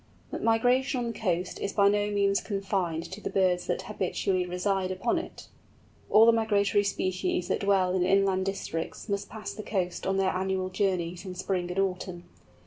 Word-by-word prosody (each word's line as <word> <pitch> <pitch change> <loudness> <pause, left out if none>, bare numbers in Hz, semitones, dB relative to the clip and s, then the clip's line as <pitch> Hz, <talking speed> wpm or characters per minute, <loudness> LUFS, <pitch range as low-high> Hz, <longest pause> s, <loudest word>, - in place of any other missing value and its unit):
But - - -4
migration 250 +4 +2
on 240 -1 -1
the - - -10
coast 180 -4 -1
is 200 - -3
by 200 -1 +4
no 205 0 +2
means 200 -1 +2
confined 195 -5 -2
to 200 +3 -7
the - - -3
birds 185 -2 +1
that - - -1
habitually 185 -2 -1
reside 185 +1 -1
upon 190 - 0
it. - - -9 0.6
All 220 +1 +7
the 230 - +7
migratory 205 -2 +2
species 185 -2 -1
that - - +1
dwell 195 -2 +2
in 185 -1 +2
inland 190 0 +2
districts 170 -3 -4
must 200 -1 -2
pass 220 -1 -6
the 215 - -6
coast 190 -4 -2
on 195 0 +1
their 190 -1 +2
annual 190 0 -1
journeys 185 -2 -1
in 185 -2 -7
spring 180 -1 -2
and 180 - -5
autumn. 185 -2 -2
195 Hz, 185 wpm, -28 LUFS, 185-205 Hz, 0.6 s, All